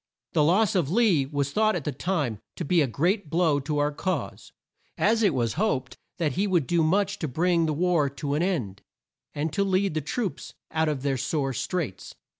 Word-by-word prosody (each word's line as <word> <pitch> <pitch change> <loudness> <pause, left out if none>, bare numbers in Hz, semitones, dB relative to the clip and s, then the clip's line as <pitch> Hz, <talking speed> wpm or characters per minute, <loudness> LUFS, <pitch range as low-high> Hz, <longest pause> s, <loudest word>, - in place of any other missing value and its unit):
The 150 - +3
loss 190 +7 +3
of 175 -8 +1
Lee 185 - +3
was 140 -1 -2
thought 215 +4 +2
at 170 - -3
the 150 - -2
time 145 - -2 0.2
to - - -4
be 170 +2 +3
a 145 - +2
great 175 - 0
blow 160 -3 +2
to 150 +2 -3
our 145 0 +1
cause, 165 -1 -4 0.5
as 225 +2 +2
it 205 -4 +4
was 115 -5 0
hoped 135 -12 -1 0.2
that 165 -5 0
he 195 +9 0
would 175 -7 +2
do 170 +4 +1
much 195 +5 +1
to 160 - -2
bring 165 +4 +1
the 155 - 0
war 165 -2 +2
to 140 +1 -4
an 150 - +1
end, 135 - -2 0.5
and 150 +1 -2
to 200 - +1
lead 195 -1 +1
the 155 - -1
troops 195 - -4 0.2
out 160 0 +1
of 140 -3 -3
their 140 -2 0
sore 135 +1 -1
straits. 150 - -4
160 Hz, 210 wpm, -26 LUFS, 140-185 Hz, 0.5 s, it